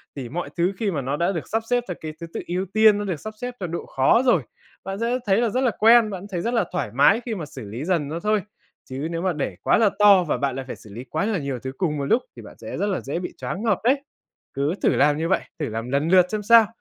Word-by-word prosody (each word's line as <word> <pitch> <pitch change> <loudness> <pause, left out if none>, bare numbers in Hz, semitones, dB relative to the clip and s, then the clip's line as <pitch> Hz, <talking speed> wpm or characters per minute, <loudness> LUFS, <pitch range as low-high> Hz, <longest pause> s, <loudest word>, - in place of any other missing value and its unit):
thì 130 -4 -6
mọi 175 +6 -4
thứ 175 +3 +1
khi 210 -1 -1
mà 150 -5 -2
nó 135 +3 -2
đã 170 +4 +1
được 165 -6 -4
sắp 225 +1 -1
xếp 245 -1 +2
theo 180 - -4
cái 155 -1 -6
thứ 170 - -5
tự - - -3
ưu 180 +2 -1
tiên, 215 -1 +6
nó 205 - -3
được 180 -6 -3
sắp 215 +6 -7
xếp 245 0 -4
theo 180 - -3
độ 170 +1 -5
khó 135 - +3
rồi, 185 - +4 0.4
bạn 195 +2 -5
sẽ 240 +2 0
thấy 195 -1 +3
là 235 - +2
rất 255 +4 0
là 250 -3 +2
quen, 225 0 +6
bạn 190 -1 -6
thấy 175 -2 -2
rất 235 +6 -2
là 235 - +2
thoải 175 - -2
mái 145 - +4
khi 230 -3 -3
mà 170 - -5
xử 130 -5 -9
lý 120 +9 -5
dần 170 -6 0
nó 160 +3 -4
thôi. 210 +2 +1 0.5
Chứ 135 +4 -4
nếu 165 0 -3
mà 185 -1 0
để 150 - -3
quá - - +3
là 220 -2 +4
to 200 -3 +7
và 155 - -1
bạn 140 -2 -1
lại 135 0 -5
phải - - -5
xử 110 - -16
lý 120 +4 -7
quá 155 +8 -2
là 215 -3 0
nhiều 140 -4 -4
thứ 130 +2 -5
cùng 160 -6 -1
một 140 - -2
lúc 230 - +2
thì - - -10
bạn - - -13
sẽ - - -7
rất 205 - 0
là 195 - -1
dễ 140 +5 -3
bị 180 - -6
choáng 200 - -5
ngợp 215 -5 +2
đấy. 265 +4 +3 0.5
Cứ 140 +5 0
thử - - +4
làm 145 0 +4
như 165 +1 -1
vậy, 190 - +2 0.2
thử 150 - -2
làm 115 +2 -5
lần 140 +4 +1
lượt 180 0 +6
xem 215 -1 -2
sao. 230 +1 +7
180 Hz, 305 wpm, -23 LUFS, 145-215 Hz, 0.5 s, to